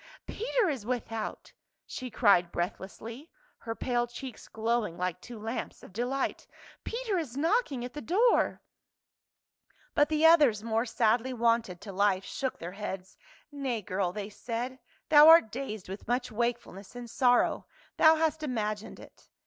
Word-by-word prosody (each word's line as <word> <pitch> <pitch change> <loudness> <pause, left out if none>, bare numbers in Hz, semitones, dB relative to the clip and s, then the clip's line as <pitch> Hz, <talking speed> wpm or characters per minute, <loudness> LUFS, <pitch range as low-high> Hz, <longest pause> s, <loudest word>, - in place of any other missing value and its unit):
" - - -38
Peter 460 0 0
is 275 -9 -2
without 225 -2 -4 0.2
!" - - -53
she 255 -1 -6
cried 200 -7 +3
breathlessly, 220 - -5 0.3
her 225 -1 -5
pale 240 -1 0
cheeks 240 +1 -9
glowing 220 -5 -1
like 180 0 -2
two 240 +3 -9
lamps 225 +3 -5
of - - -13
delight. 250 +5 -2 0.2
" - - -22
Peter 455 -5 -2
is 275 -6 -6
knocking 310 - +1
at 250 - -8
the 295 - -6
door 430 - +2 0.6
!" - - -38
But 290 0 +3
the 310 0 +2
others, 290 -11 +6
more 225 +1 0
sadly 230 +3 +1
wonted 230 -6 +1
to 205 - -8
life, 195 -1 +2
shook 265 -2 -3
their 170 +1 -7
heads. 190 -2 -6 0.4
"Nay, 265 -6 -3
girl," 185 -1 -1
they 205 +2 -5
said, 245 +4 -5 0.3
"thou 300 0 +9
art 325 -10 +7
dazed 220 -6 -5
with 195 +3 -8
much 245 +1 -1
wakefulness 235 -3 -3
and 245 -1 -7
sorrow; 245 +1 +2 0.3
thou 315 0 +7
hast 315 -1 0
imagined 215 -7 -3
it." - - -16
240 Hz, 160 wpm, -29 LUFS, 210-275 Hz, 0.6 s, thou